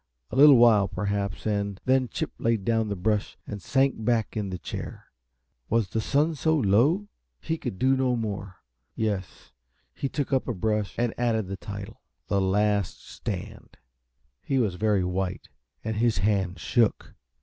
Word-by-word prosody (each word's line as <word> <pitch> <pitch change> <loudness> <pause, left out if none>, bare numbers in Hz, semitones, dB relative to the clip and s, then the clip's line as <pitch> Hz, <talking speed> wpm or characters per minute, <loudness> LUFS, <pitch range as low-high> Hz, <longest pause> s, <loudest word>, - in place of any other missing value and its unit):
A - - -4
little 140 0 +8
while 110 -4 +6
perhaps, 100 -1 -3
and 100 -2 -1
then 130 0 +3
Chip - - -3
laid 115 -4 0
down 115 -1 +1
the 100 - -1
brush 100 - -1
and 105 -1 -6
sank 135 +1 +1
back 115 -1 0
in 105 -3 -2
the 90 - -4
chair. - - -7 0.6
Was 115 -3 +1
the 110 - -1
sun 150 +7 +1
so 160 +2 +1
low? 140 - +3 0.3
He 160 - -2
could 95 - -4
do 130 +5 +3
no 130 -2 +1
more 100 -5 -5 0.3
yes, 100 -7 -3 0.4
he 135 - -3
took 140 -1 -2
up 130 - +1
a 120 - -2
brush 105 +1 -1
and 120 -1 0
added 115 -3 +1
the 95 +1 -5
title: 100 0 -8 0.3
"The 100 -1 +2
Last 100 0 0
Stand." - - -7 0.6
He 135 - -1
was 110 -7 +1
very 105 0 +1
white, 90 0 -3 0.3
and 110 0 -3
his 115 -1 +2
hand 95 -2 +1
shook. 115 +6 +1
110 Hz, 165 wpm, -26 LUFS, 100-120 Hz, 0.6 s, little